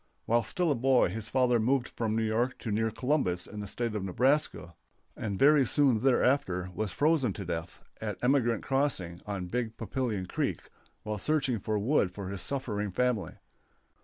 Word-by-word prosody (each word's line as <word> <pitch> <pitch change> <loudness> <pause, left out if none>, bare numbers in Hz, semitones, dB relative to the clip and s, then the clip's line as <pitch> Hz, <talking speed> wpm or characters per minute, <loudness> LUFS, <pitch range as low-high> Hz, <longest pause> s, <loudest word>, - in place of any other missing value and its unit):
While 120 +1 +3
still 165 - 0
a - - +2
boy 130 -3 +3
his 110 +3 -5
father 125 -2 +3
moved 125 +3 +1
from 110 -2 -2
New 115 - +1
York 115 +4 0
to 110 - -3
near 110 +2 +1
Columbus 110 - 0
in 105 - -8
the 105 - -5
State 115 +2 -2
of 105 -3 -3
Nebraska, 125 - 0 0.4
and 100 -3 -3
very 145 +3 +6
soon 130 -2 +3
thereafter 120 -8 +2
was 105 -1 -2
frozen 145 -8 +2
to 100 - -6
death 80 -2 -5 0.2
at 105 -3 -3
Emigrant 125 -3 +2
Crossing, 135 -12 -1
on 100 -3 -3
Big 115 +3 -3
Papillion 115 -3 -2
Creek, - - -2 0.4
while 105 -1 -3
searching 135 -2 +1
for 110 +2 -1
wood 105 -1 +2
for 95 0 -6
his 100 -1 -3
suffering 105 -7 -2
family. 105 -2 -1
115 Hz, 175 wpm, -29 LUFS, 100-130 Hz, 0.4 s, very